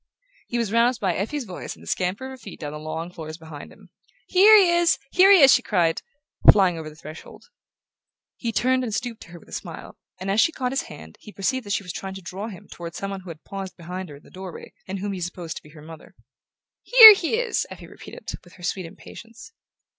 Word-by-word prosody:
He 240 Hz, -, -3 dB
was 230 Hz, -4 st, -1 dB
roused 235 Hz, +2 st, +2 dB
by 190 Hz, -4 st, 0 dB
Effie's 255 Hz, -, -3 dB
voice 185 Hz, -6 st, -8 dB
and -, -, -18 dB
the -, -, -15 dB
scamper 185 Hz, +7 st, -2 dB
of 265 Hz, -, -7 dB
her 265 Hz, -, -10 dB
feet 200 Hz, -, -11 dB
down 145 Hz, -2 st, -6 dB
the 150 Hz, -, -7 dB
long 160 Hz, +3 st, -6 dB
floors 155 Hz, -2 st, -8 dB
behind 160 Hz, -3 st, -11 dB
him. -, -, -19 dB, 0.3 s
"Here 415 Hz, +4 st, +7 dB
he 375 Hz, -4 st, +5 dB
is! 345 Hz, -1 st, +3 dB
Here 380 Hz, +2 st, +6 dB
he 385 Hz, -5 st, +7 dB
is!" 270 Hz, -, +8 dB
she 250 Hz, -, +3 dB
cried, 175 Hz, -8 st, 0 dB, 0.5 s
flying 190 Hz, -4 st, +2 dB
over 155 Hz, -1 st, -7 dB
the 150 Hz, -, -15 dB
threshold. 155 Hz, 0 st, -12 dB, 0.9 s
He 235 Hz, -, -4 dB
turned 255 Hz, +3 st, +1 dB
and 220 Hz, -4 st, -3 dB
stooped 240 Hz, -2 st, -5 dB
to -, -, -12 dB
her 170 Hz, 0 st, -12 dB
with -, -, -21 dB
a -, -, -17 dB
smile, -, -, -8 dB, 0.2 s
and 190 Hz, +1 st, -3 dB
as 210 Hz, +3 st, +3 dB
she 330 Hz, -, +3 dB
caught 255 Hz, -5 st, -3 dB
his 270 Hz, -, -2 dB
hand 80 Hz, +1 st, -12 dB
he 210 Hz, -, -12 dB
perceived 235 Hz, +4 st, -2 dB
that 200 Hz, -, -1 dB
she 200 Hz, -, -1 dB
was 180 Hz, -, -7 dB
trying 190 Hz, 0 st, -6 dB
to 195 Hz, -, -9 dB
draw 190 Hz, +5 st, -6 dB
him 195 Hz, -6 st, -11 dB
toward 170 Hz, -1 st, -9 dB
some 195 Hz, 0 st, -5 dB
one 195 Hz, -1 st, -6 dB
who 185 Hz, -, -12 dB
had 160 Hz, -1 st, -10 dB
paused 195 Hz, -1 st, -8 dB
behind 180 Hz, +1 st, -7 dB
her 145 Hz, -, -10 dB
in 140 Hz, -, -17 dB
the -, -, -19 dB
doorway, 185 Hz, -2 st, -10 dB
and 190 Hz, +1 st, -4 dB
whom 200 Hz, +1 st, -4 dB
he 185 Hz, -, -6 dB
supposed 175 Hz, -1 st, -6 dB
to -, -, -9 dB
be 150 Hz, -, -17 dB
her 150 Hz, 0 st, -15 dB
mother. 160 Hz, 0 st, -13 dB, 0.7 s
"HERE 455 Hz, -3 st, +11 dB
he 385 Hz, +1 st, -1 dB
is!" 475 Hz, 0 st, -1 dB
Effie -, -, -11 dB
repeated, -, -, -10 dB
with 175 Hz, -, -19 dB
her 175 Hz, -, -16 dB
sweet 180 Hz, -1 st, -3 dB
impatience. 230 Hz, -, -13 dB
195 Hz, 245 wpm, -23 LUFS, 170-250 Hz, 0.9 s, HERE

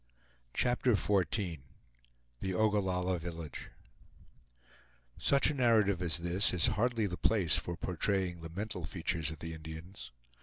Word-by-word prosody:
CHAPTER 125 Hz, -1 st, +2 dB
XIV 95 Hz, -4 st, 0 dB, 0.8 s
THE 95 Hz, +4 st, -2 dB
OGALLALLA 95 Hz, -4 st, +1 dB
VILLAGE 85 Hz, -3 st, -7 dB, 1.5 s
Such 140 Hz, +1 st, +3 dB
a -, -, -3 dB
narrative 110 Hz, -8 st, +3 dB
as 85 Hz, -3 st, +2 dB
this 85 Hz, +4 st, +2 dB
is 85 Hz, -, +3 dB
hardly 115 Hz, 0 st, +1 dB
the 90 Hz, -3 st, -3 dB
place 95 Hz, -8 st, +4 dB
for 85 Hz, -1 st, -3 dB
portraying 90 Hz, +1 st, -1 dB
the 80 Hz, -, -7 dB
mental 95 Hz, +1 st, -5 dB
features 80 Hz, -1 st, -1 dB
of 80 Hz, -, -7 dB
the 80 Hz, +1 st, -6 dB
Indians. 80 Hz, -2 st, -9 dB
90 Hz, 125 wpm, -32 LUFS, 85-105 Hz, 1.5 s, place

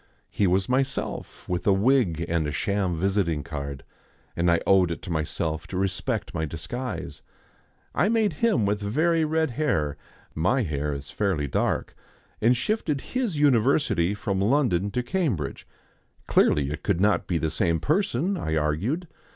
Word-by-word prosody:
He 100 Hz, -, +2 dB
was 95 Hz, +2 st, +2 dB
myself 135 Hz, +2 st, -2 dB
with 90 Hz, +1 st, -2 dB
a 100 Hz, -, +6 dB
wig 100 Hz, -, +2 dB
and 85 Hz, -2 st, 0 dB
a -, -, -2 dB
sham 95 Hz, 0 st, -1 dB
visiting 90 Hz, -4 st, 0 dB
card, 70 Hz, -3 st, -6 dB, 0.5 s
and 85 Hz, +1 st, +2 dB
I 85 Hz, -1 st, +4 dB
owed 95 Hz, -2 st, +4 dB
it 85 Hz, -, -5 dB
to 90 Hz, -, -6 dB
myself 80 Hz, 0 st, -2 dB
to 95 Hz, -, -5 dB
respect 95 Hz, +4 st, -1 dB
my 80 Hz, -3 st, -2 dB
disguise. 120 Hz, -, -5 dB, 0.7 s
I 175 Hz, +9 st, +2 dB
made 220 Hz, -5 st, +2 dB
him 225 Hz, -, +3 dB
with 105 Hz, +1 st, 0 dB
very 160 Hz, +11 st, +2 dB
red 160 Hz, -2 st, +1 dB
hair 80 Hz, -, 0 dB, 0.4 s
my 120 Hz, +11 st, +1 dB
hair 75 Hz, -4 st, -2 dB
is 70 Hz, -1 st, -6 dB
fairly 95 Hz, -8 st, 0 dB
dark 65 Hz, -, -1 dB, 0.5 s
and 120 Hz, +3 st, +4 dB
shifted 155 Hz, -, -1 dB
his 245 Hz, -, 0 dB
university 130 Hz, -, +3 dB
from 100 Hz, -1 st, -2 dB
London 100 Hz, -5 st, +2 dB
to 125 Hz, +4 st, -2 dB
Cambridge. 120 Hz, -, -2 dB, 0.6 s
Clearly 70 Hz, -1 st, +3 dB
it 75 Hz, -, -5 dB
could 100 Hz, -5 st, 0 dB
not 100 Hz, -2 st, +2 dB
be 85 Hz, -, 0 dB
the 80 Hz, -1 st, -1 dB
same 85 Hz, -2 st, +1 dB
person, 180 Hz, -, 0 dB
I 80 Hz, -, -2 dB
argued. 90 Hz, -, -1 dB
100 Hz, 160 wpm, -25 LUFS, 80-135 Hz, 0.7 s, a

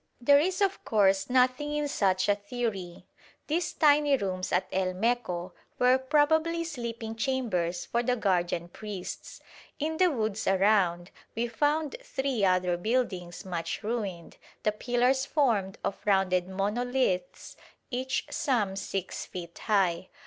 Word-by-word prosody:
There 280 Hz, +4 st, +6 dB
is 370 Hz, +6 st, 0 dB
of 395 Hz, -1 st, +1 dB
course 195 Hz, -2 st, +2 dB
nothing 255 Hz, +4 st, +2 dB
in 295 Hz, 0 st, 0 dB
such 190 Hz, -8 st, +1 dB
a 205 Hz, -, +5 dB
theory. 205 Hz, -4 st, -4 dB, 0.4 s
These 335 Hz, +3 st, -1 dB
tiny 295 Hz, -2 st, +4 dB
rooms 185 Hz, -4 st, -3 dB
at -, -, +2 dB
El 185 Hz, -1 st, 0 dB
Meco 185 Hz, -5 st, -1 dB, 0.2 s
were 250 Hz, +1 st, +4 dB
probably 315 Hz, +5 st, +2 dB
sleeping 235 Hz, -7 st, -5 dB
chambers 215 Hz, -9 st, -1 dB
for 235 Hz, -, 0 dB
the 245 Hz, +1 st, +1 dB
guardian 175 Hz, -5 st, 0 dB
priests. 200 Hz, -1 st, -7 dB, 0.4 s
In 315 Hz, +2 st, -2 dB
the 365 Hz, +1 st, +5 dB
woods 220 Hz, -7 st, -2 dB
around 190 Hz, -3 st, +2 dB, 0.2 s
we 235 Hz, +1 st, 0 dB
found 295 Hz, +5 st, 0 dB
three 270 Hz, -, -2 dB
other 185 Hz, -2 st, +2 dB
buildings 185 Hz, -5 st, -2 dB
much 175 Hz, +2 st, -4 dB
ruined, 205 Hz, -7 st, -4 dB, 0.3 s
the 210 Hz, -, +3 dB
pillars 245 Hz, +4 st, +1 dB
formed 220 Hz, -10 st, +1 dB
of 200 Hz, -, -2 dB
rounded 190 Hz, -3 st, +2 dB
monoliths 205 Hz, -1 st, -1 dB, 0.4 s
each 255 Hz, +1 st, -1 dB
some 220 Hz, -9 st, 0 dB
6 195 Hz, -1 st, -4 dB
feet 170 Hz, -2 st, -8 dB
high. 185 Hz, -4 st, +1 dB
220 Hz, 135 wpm, -28 LUFS, 185-260 Hz, 0.4 s, There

